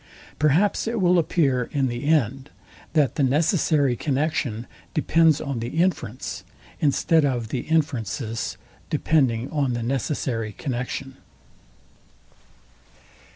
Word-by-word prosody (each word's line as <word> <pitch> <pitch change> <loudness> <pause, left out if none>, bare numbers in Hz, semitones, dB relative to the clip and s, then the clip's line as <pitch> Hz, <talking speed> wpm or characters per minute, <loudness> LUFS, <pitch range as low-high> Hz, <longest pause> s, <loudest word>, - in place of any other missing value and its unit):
Perhaps 165 +10 +2
it 230 0 -1
will 180 -1 +4
appear 135 -7 +1
in 140 -2 +1
the 120 +1 -3
end, 135 -2 +1 0.4
that 150 -5 +2
the 145 - +2
necessary 145 -1 +2
connexion 140 -4 -1 0.3
depends 160 0 +4
on 140 -5 -3
the 115 - -3
inference, 140 - -1 0.4
instead 155 +2 +3
of 120 -5 -1
the 130 - -2
inference's 120 - -1 0.3
depending 130 -6 +1
on 140 -5 0
the 120 -1 -2
necessary 120 -3 -2
connexion. 130 +2 -4
140 Hz, 110 wpm, -24 LUFS, 120-155 Hz, 0.4 s, will